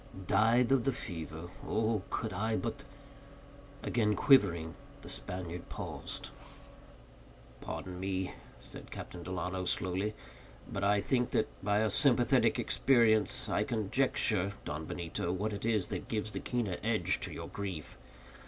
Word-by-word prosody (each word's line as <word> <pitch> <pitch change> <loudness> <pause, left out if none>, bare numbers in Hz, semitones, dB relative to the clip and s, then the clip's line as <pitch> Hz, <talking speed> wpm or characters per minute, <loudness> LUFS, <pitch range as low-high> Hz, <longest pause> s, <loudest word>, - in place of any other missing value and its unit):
"Died 115 +6 +4
of 135 -3 +4
the 135 - +2
fever. 80 - -6 0.2
Oh, 110 -1 +1
could 110 -4 -2
I 110 +4 0
but—" 120 +5 -3 1.0
Again 105 -3 +2
quivering, 85 - +4 0.3
the - - -9
Spaniard 90 -1 -4
paused. - - -4 1.3
"Pardon 90 -1 -6
me," 95 -1 -2 0.3
said - - -10
Captain 90 - -7
Delano, 90 +1 -3 0.2
lowly, 95 +4 -1 0.5
"but 100 - -3
I 100 0 +4
think 125 +2 +1
that, 110 - +2
by 105 +1 +3
a 110 - +2
sympathetic - - +4
experience, 115 -5 +3
I - - +1
conjecture, 110 -3 +1
Don 75 +2 -4
Benito, 85 0 -2
what 105 +4 -1
it 100 - -4
is 105 -6 +2
that - - -4
gives 110 -1 -2
the - - -3
keener 115 -8 -1
edge 110 -1 +2
to - - -3
your - - -6
grief. 95 -6 -5
105 Hz, 135 wpm, -33 LUFS, 90-115 Hz, 1.3 s, Died